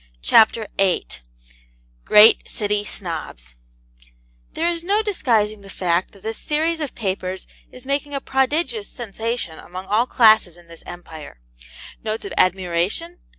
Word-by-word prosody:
CHAPTER 220 - +4
VIII 195 - +2 1.0
GREAT 210 +2 +6
CITY 205 -1 -2
SNOBS 155 - -6 1.0
There 330 - -1
is 340 -1 -1
no 410 +4 +1
disguising 225 - 0
the 195 - -13
fact 180 -1 -1
that 195 - -18
this 220 0 -4
series 320 +2 0
of 295 -4 -4
papers 190 -3 -3 0.3
is 250 0 -12
making 280 +1 -2
a - - -1
prodigious 300 - -1
sensation 230 - -5
among 185 +2 -9
all 215 +5 +1
classes 215 -9 +4
in 175 - -17
this 170 0 -14
Empire. 160 - -10 0.6
Notes 220 - -3
of 395 - -6
admiration 185 - 0
215 Hz, 135 wpm, -21 LUFS, 185-275 Hz, 1.0 s, GREAT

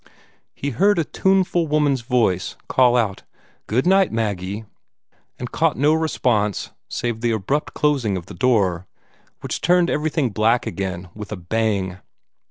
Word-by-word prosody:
He 140 - -3
heard 200 - +3
a 165 - +2
tuneful 185 -1 +1
woman's 145 -3 +2
voice 115 -7 0
call 125 -1 +4
out 105 -5 0 0.5
"Good 125 +5 +1
night, 190 +1 +4
Maggie," 105 -1 -3 0.7
and - - -6
caught - - +1
no 145 +4 +4
response 120 - 0 0.2
save 120 -2 -3
the 120 - +1
abrupt 115 +7 -1
closing 135 -10 +1
of 85 - -7
the - - -10
door, 100 -8 +1 0.5
which - - -4
turned 175 0 +3
everything 150 -4 0
black 110 +4 +2
again 95 -2 -4
with 105 0 -9
a 105 - -4
bang. 95 0 -1
120 Hz, 145 wpm, -21 LUFS, 100-150 Hz, 0.7 s, call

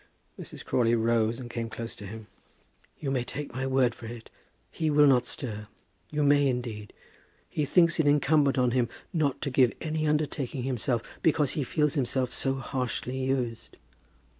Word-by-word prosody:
Mrs. - - -9
Crawley 120 -1 +2
rose 115 0 +1
and 125 - -7
came 115 -1 -4
close 115 +1 -6
to 100 - -9
him. 110 +2 -8 0.7
"You 140 -3 -3
may 130 -3 0
take 145 +2 -6
my 130 +2 -2
word 130 -3 +3
for 115 - -10
it, 115 0 -9 0.4
he 160 -1 -1
will 150 0 +6
not 125 -3 +4
stir. 105 -6 -5 0.4
You 150 0 0
may 145 0 +5
indeed. 120 -5 -3 0.6
He 150 - -1
thinks 170 +2 +4
it 155 - +3
incumbent 145 -1 +3
on 125 -1 +3
him 120 -1 +1 0.2
not 150 -5 0
to 140 - -2
give 125 -2 +4
any 155 -1 -1
undertaking 145 -4 -1
himself, 125 -2 0 0.2
because 150 -4 +2
he 150 - -1
feels 150 +2 +1
himself 130 -3 0
to - - -7
be - - -5
so 135 - +1
harshly 130 -1 -3
used." 125 -4 -2
130 Hz, 180 wpm, -28 LUFS, 120-145 Hz, 0.7 s, will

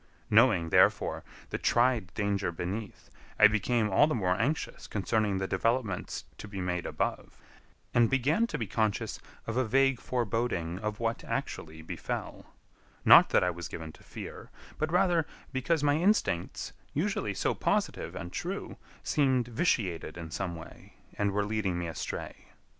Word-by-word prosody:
Knowing, 110 -7 +5
therefore, - - +3 0.3
the - - -2
tried 120 -7 +2
danger 100 -3 0
beneath, 95 +6 -5 0.3
I 110 - +8
became 110 +1 +1
all 120 +10 +5
the 155 - 0
more 95 -5 +1
anxious 150 +10 -2
concerning 105 -1 0
the 95 - -1
developments 110 +1 -1
to - - -7
be 100 -1 -6
made 90 -1 -2
above, - - -3 0.6
and 120 -2 +4
began 145 - +2
to 150 - -3
be 115 - -2
conscious 110 0 -1 0.3
of 115 +1 -3
a 130 - +3
vague 135 +2 +3
foreboding 115 -8 -1
of 105 0 -3
what 115 0 -1
actually 80 0 -4
befell; - - -5 0.6
not - - +9
that - - +4
I 90 - +2
was 85 0 -6
given 80 -1 -7
to - - -18
fear, - - -9 0.3
but 155 +1 0
rather 175 -3 +3 0.3
because 145 +4 +1
my 145 0 +3
instincts, 160 - 0 0.2
usually 155 - -1
so - - +1
positive - - -1
and 85 - -6
true, - - -4 0.3
seemed 130 -4 +2
vitiated 100 - 0
in 85 -2 -7
some 90 0 -3
way, 80 - -12 0.2
and 100 0 +1
were 100 +1 0
leading 105 -4 -1
me 85 - -2
astray. 80 - -6
110 Hz, 155 wpm, -30 LUFS, 90-130 Hz, 0.6 s, not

